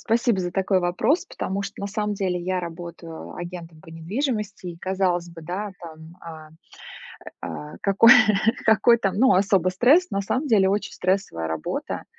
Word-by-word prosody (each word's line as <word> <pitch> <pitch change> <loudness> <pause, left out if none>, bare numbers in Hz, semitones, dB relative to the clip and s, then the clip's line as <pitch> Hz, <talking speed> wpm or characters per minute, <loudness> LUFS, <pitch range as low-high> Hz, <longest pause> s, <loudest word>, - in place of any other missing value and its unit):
спасибо 230 -2 +1
за 180 -1 -2
такой 190 0 +1
вопрос, 215 - +1
потому 200 - -4
что 200 0 -8
на 200 - -3
самом 210 +1 -2
деле 185 -2 -1
я 185 +1 -2
работаю 170 -1 -8
агентом 170 -2 -8
по 160 - -17
недвижимости. 205 - -4
И 175 -1 -6
казалось 180 -2 -1
бы, 170 - -11
да, 185 +6 -5
там, 160 0 -12
а 160 -2 -10 0.9
а 75 0 -7
какой, 200 +4 +6 0.5
какой 230 +2 +5
там, 195 -4 -1
ну, 260 +5 +5
особо 190 -1 +2
стресс. 270 - +3
На 200 - -1
самом 255 +9 -2
деле 205 -7 +4
очень 205 +1 -1
стрессовая 180 - -1
работа. 80 -1 -4
185 Hz, 160 wpm, -23 LUFS, 170-210 Hz, 0.9 s, какой